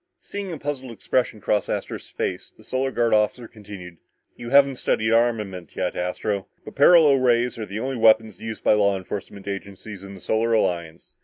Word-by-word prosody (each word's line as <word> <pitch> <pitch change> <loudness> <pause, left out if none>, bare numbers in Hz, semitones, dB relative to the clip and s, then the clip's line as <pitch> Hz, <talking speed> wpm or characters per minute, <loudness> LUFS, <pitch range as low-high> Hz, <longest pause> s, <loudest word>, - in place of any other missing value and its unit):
Seeing 200 -2 -6
a 165 - -5
puzzled 140 -3 -4
expression 115 +1 -1
cross 105 +1 0
Astro's - - -4
face, - - -4
the - - -21
Solar 130 +1 -1
Guard 120 -3 +1
officer 110 +3 +1
continued, 100 -6 -11 0.4
"You 120 - -8
haven't 140 0 +5
studied 110 -2 0
armament 105 -7 0
yet, - - -2
Astro, 95 +3 -2 0.2
but - - -9
paralo 155 0 +6
rays 120 -1 +2
are 110 - -4
the 105 +2 -5
only 130 +2 -3
weapons 110 -3 +3
used 110 -1 -6
by - - +5
law 100 -2 +3
enforcement 95 +1 -7
agencies 100 0 -7
in 100 0 -9
the - - -11
Solar 115 +4 0
Alliance. 85 -6 -2
110 Hz, 180 wpm, -23 LUFS, 100-125 Hz, 0.4 s, paralo